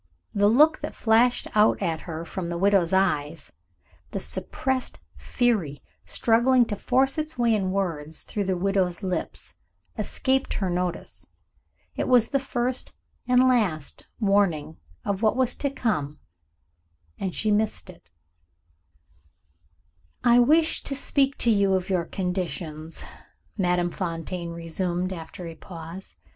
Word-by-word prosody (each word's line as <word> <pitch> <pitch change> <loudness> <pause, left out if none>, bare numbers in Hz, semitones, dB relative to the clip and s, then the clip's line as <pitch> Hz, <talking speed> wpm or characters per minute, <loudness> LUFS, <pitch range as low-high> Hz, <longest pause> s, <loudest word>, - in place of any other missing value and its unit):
The 205 0 +3
look 300 +8 +5
that - - -6
flashed 235 +2 +3
out 215 0 +4
at 160 -2 -1
her 165 0 -6
from 170 0 -5
the 170 - -3
widow's 195 -2 +3
eyes, 165 -5 0 0.6
the - - -4
suppressed 265 -1 -2 0.2
fury 210 - 0 0.2
struggling 240 +2 +3
to 210 - -3
force 265 +7 +1
its 310 -1 -4
way 235 -2 +3
in 195 -3 0
words 165 -6 -3
through 205 -2 -3
the 185 -1 0
widow's 190 -1 0
lips, 185 -1 -3 0.5
escaped 265 0 0
her 190 -3 -1
notice. 180 0 -4 0.7
It - - -1
was 245 -3 +5
the 275 - +1
first, 255 -1 -2 0.3
and 250 +1 +5
last, 195 - 0
warning 195 - +1 0.3
of 200 -1 -1
what 220 +2 +2
was 255 -2 +2
to 280 - 0
come 150 - -2 1.0
and 190 -2 -3
she 215 - +1
missed 210 0 0
it. 185 - -14 2.1
"I 240 0 +6
wished 315 +6 +3
to 275 - 0
speak 275 0 +1
to 235 - +3
you 200 -2 +3
of 185 +1 -2
your 175 -3 +1
conditions," 175 -4 -4 0.5
Madame 180 -3 +1
Fontaine 170 -1 -4
resumed, 175 +2 -2
after 170 +1 -8
a 165 - -6
pause. 170 +2 -10
195 Hz, 135 wpm, -25 LUFS, 170-240 Hz, 2.1 s, I